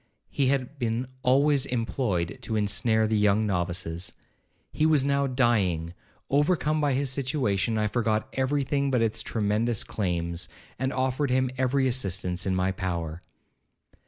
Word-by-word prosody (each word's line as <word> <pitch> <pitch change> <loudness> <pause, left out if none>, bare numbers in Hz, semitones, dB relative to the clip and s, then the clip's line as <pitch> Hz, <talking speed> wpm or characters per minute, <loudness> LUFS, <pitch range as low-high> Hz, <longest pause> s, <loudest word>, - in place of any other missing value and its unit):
He 140 - +1
had 135 +1 -1
been 120 0 -1 0.2
always 140 +2 +3
employed 115 -7 -1
to 110 - -3
ensnare 110 +2 +2
the 110 0 0
young 105 +1 +3
novices. 90 -3 -2 0.6
He - - -1
was 150 -4 +4
now 140 0 +1
dying—overcome 125 - 0
by 145 -2 +2
his 135 0 0
situation, 125 -6 0
I 105 - +1
forgot 110 0 0
every 135 +2 0
thing 140 +1 0
but 125 -3 +2
its 110 -1 0
tremendous 110 +1 0
claims, 85 -3 -2 0.3
and 130 +1 0
offered 130 +2 0
him 130 0 +1
every 130 +1 +1
assistance 95 -7 -1
in 95 - +1
my 95 +1 +1
power. 85 -4 -4
115 Hz, 140 wpm, -27 LUFS, 95-135 Hz, 0.6 s, was